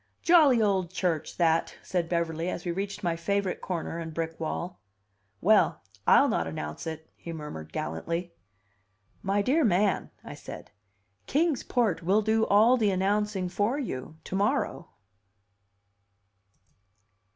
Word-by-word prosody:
"Jolly 310 -8 +6
old 195 -5 +1
church, 175 -4 -2
that," 165 -2 +2
said 175 -3 -2
Beverly, 170 0 -1
as 175 - -5
we 175 - -1
reached 195 +3 -4
my 170 -2 +1
favorite 195 +2 -1
corner 170 -2 -4
and 160 -2 -6
brick 165 0 -3
wall. 170 +2 -4 0.6
"Well, - - +4 0.3
I'll - - +7
not 85 - 0
announce 75 - -5
it!" 160 0 -6
he 170 - -8
murmured 150 - -7
gallantly. 165 - -3 0.9
"My 200 +1 +1
dear 300 +8 +3
man," 195 -3 +2
I - - -8
said, - - -10 0.6
"Kings 310 -1 +1
Port 220 -9 0
will 195 +6 +2
do 220 +1 +2
all 220 +5 +5
the 215 -4 +2
announcing 195 0 0
for 205 +8 0
you 155 - -5
to - - -5
morrow." 205 -3 0
185 Hz, 135 wpm, -28 LUFS, 165-210 Hz, 0.9 s, I'll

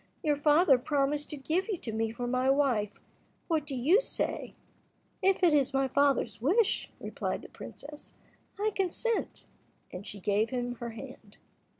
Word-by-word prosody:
Your 295 -2 +2
father 295 -1 +5
promised 290 +2 0
to 300 - -5
give 325 +8 -1
you 415 -5 -1
to 235 - -6
me 220 0 -1
for 245 +2 -4
my 255 +2 +1
wife: 250 -7 +1 0.5
what 315 -3 0
do 275 - -3
you 315 - +4
say?" - - -2 0.7
"If 385 -1 +2
it 340 -3 +6
is 275 -2 +2
my 270 0 +2
father's 280 -3 +1
wish," 380 - +2
replied - - -4
the - - -11
princess, 295 +1 -11 0.4
"I 430 +1 +1
consent," 395 +5 -1 0.5
and 180 - -6
she 200 - -7
gave 205 +3 +1
him 245 -1 -2
her 235 0 -5
hand. 225 - -11
280 Hz, 165 wpm, -30 LUFS, 245-320 Hz, 0.7 s, it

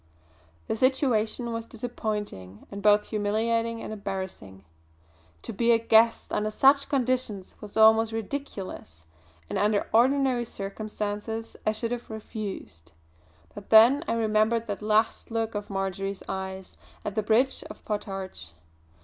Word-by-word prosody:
The - - -2
situation 240 -2 +1
was 230 0 -4
disappointing 210 - -5
and 200 0 -6
both 210 0 +5
humiliating 230 +2 0
and - - -5
embarrassing. 190 - -6 0.8
To - - -5
be 235 +3 +2
a 230 - +6
guest 225 0 +3
under 215 0 0
such 275 +5 +4
conditions 250 -7 -1
was 210 0 -8
almost 220 0 +6
ridiculous; 200 - -6 0.4
and - - -2
under 205 0 +2
ordinary 255 +1 +3
circumstances 210 +2 -5
I - - +5
should 230 +2 -3
have 240 -1 -4
refused. 210 - -7 0.6
But - - -11
then 235 +7 +7
I - - +1
remembered 220 0 +2
that 205 -3 -4
last 215 +1 +1
look 225 -1 -2
of 205 -1 -5
Marjory's 195 0 -3
eyes 190 0 -5 0.3
at 205 - -2
the 215 - 0
bridge 230 +5 +2
of - - -12
Potarch! 195 - -5
215 Hz, 130 wpm, -27 LUFS, 200-230 Hz, 0.8 s, then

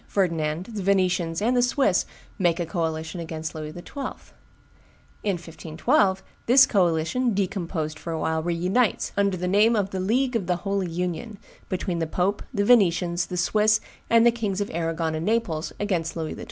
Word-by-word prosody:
Ferdinand, 165 -3 0
the 210 - -3
Venetians, 185 -2 +1
and 245 +3 +2
the 245 - +4
Swiss 245 -6 +2 0.3
make 175 -2 +2
a 175 - 0
coalition 160 0 -3
against 160 -1 -5
Louis 155 -1 -6
XII. 175 +3 -10 1.4
In 200 -3 0
1512, 185 - 0 0.2
this 265 +3 +8
coalition, 195 +3 +1
decomposed 170 -5 -2
for 170 - -6
a 165 - -2
while, 160 0 0
re 170 +1 -1
unites, 195 +7 +1
under 200 -2 +1
the 180 +1 -2
name 210 +5 +4
of 200 -2 0
the 190 - -3
League 245 +7 +1
of 200 -6 -1
the 180 - +2
Holy 195 -2 0
Union, 180 +5 -3 0.3
between 180 -2 -2
the 165 - -1
pope, 190 +5 0
the 205 -5 0
Venetians, 175 -6 +3
the 180 - -5
Swiss, 215 +4 +3 0.3
and 230 0 +5
the 235 - +7
Kings 210 -5 -2
of 205 - -2
Arragon 165 -1 -1
and 160 +1 -3
Naples 210 -9 0
against 180 -6 -1
Louis 160 -1 -3
XII. - - -10
185 Hz, 180 wpm, -25 LUFS, 165-205 Hz, 1.4 s, this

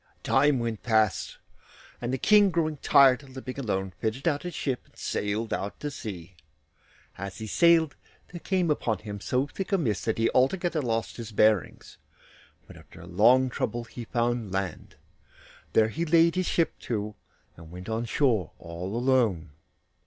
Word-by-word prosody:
Time 145 -2 +3
went 115 -3 -3
past, 110 -4 +1 0.6
and 120 +1 -2
the 130 - 0
King, 205 - +5
growing 160 -3 -1
tired 135 -1 +5
of 135 -2 -15
living 130 0 -6
alone, 95 -6 -2
fitted 115 +7 -2
out 145 -3 +1
his 175 -1 -6
ship 130 -3 -2
and - - -28
sailed 105 +2 -2
out 100 +2 -4
to 145 - -4
sea. 95 -9 -8 0.9
As 100 0 -6
he 110 - -6
sailed 165 - +4 0.3
there 175 - -8
came 180 -3 0
upon 115 -7 0
him 105 0 -7
so 125 +8 0
thick 190 +9 -6
a 195 - +4
mist 115 - -1
that 110 - 0
he 115 0 +2
altogether 170 +5 +1
lost 115 -3 -2
his 115 -2 -7
bearings, 105 -2 +1 0.7
but - - -14
after - - -14
long 120 +8 +4
trouble 120 0 -2
he 115 +1 -9
found 120 -3 -1
land. 95 -1 -4 0.8
There 110 0 +4
he 165 +9 -3
laid 165 0 +4
his 185 -1 -1
ship 165 -2 0
to, 105 -2 -3 0.4
and 80 -1 -13
went 90 +2 -10
on 115 +1 -2
shore 115 - +1
all 90 +5 -6
alone. 120 - +1
120 Hz, 165 wpm, -27 LUFS, 105-145 Hz, 0.9 s, King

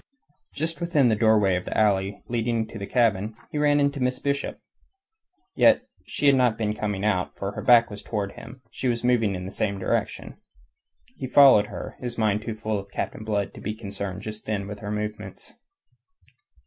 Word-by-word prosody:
Just 165 +4 -3
within 155 -7 +3
the 110 - +3
doorway 105 -3 +3
of 90 - -3
the - - -4
alley 100 -2 +1
leading 115 -1 0
to 110 - -8
the 100 - -5
cabin, 110 -2 +1 0.2
he 150 - -2
ran 145 0 +3
into 140 0 +1
Miss 125 0 0
Bishop. 140 0 -2 1.0
Yet - - +5 0.2
she - - -3
had 140 - +7
not 125 -4 +3
been 105 -2 -1
coming 105 -2 -3
out, 95 -4 0
for 100 0 -3
her - - -6
back 120 -2 +5
was 105 - -8
towards 100 -3 -3
him, 115 - -10
and 130 +1 -13
she 130 - -3
was 120 -1 -1
moving 115 -5 +2
in 90 0 -5
the 95 - -6
same 100 -1 -1
direction. 95 - -3 0.8
He 130 - -4
followed 130 -6 +7
her, - - -8
his 120 -2 -5
mind 105 -2 +1
too 110 0 -5
full 110 -1 -2
of 100 0 -10
Captain 105 - -4
Blood 105 -2 -2
to - - -11
be 105 +1 -4
concerned 100 -2 -6
just 110 0 -7
then 100 -2 -2
with 105 0 -7
her 105 - -6
movements. 105 -2 -6
110 Hz, 200 wpm, -25 LUFS, 100-125 Hz, 1.0 s, had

